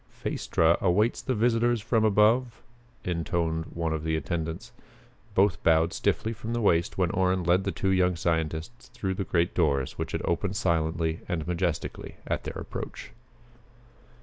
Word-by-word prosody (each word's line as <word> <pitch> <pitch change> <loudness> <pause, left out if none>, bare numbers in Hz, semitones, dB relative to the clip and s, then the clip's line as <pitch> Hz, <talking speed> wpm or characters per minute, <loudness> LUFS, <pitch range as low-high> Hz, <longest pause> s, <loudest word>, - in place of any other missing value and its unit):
"Phaestra 80 +1 +1
awaits 100 +5 +2
the 130 - -1
visitors 120 +1 +2
from 110 +1 +1
above," 110 +3 +3 0.4
intoned 85 -2 -1
one 85 -1 -2
of 80 -1 -3
the 80 0 0
attendants. 80 0 -3 0.6
Both 95 -3 +3
bowed 80 0 +3
stiffly 110 - 0
from 115 +1 -5
the 120 - 0
waist 85 -6 +2
when 90 -3 +1
Orrin 95 0 +1
led 90 +3 +2
the 100 - 0
two 95 - -1
young 90 -1 +3
scientists 80 +6 -2
through 95 -2 -2
the 100 - -2
great 85 -1 0
doors 70 -6 0
which - - -3
had - - -2
opened 95 +3 -1
silently 80 -4 0
and 80 -3 -2
majestically 85 -2 -3
at - - -2
their - - -5
approach. - - -7
90 Hz, 155 wpm, -27 LUFS, 80-105 Hz, 0.6 s, above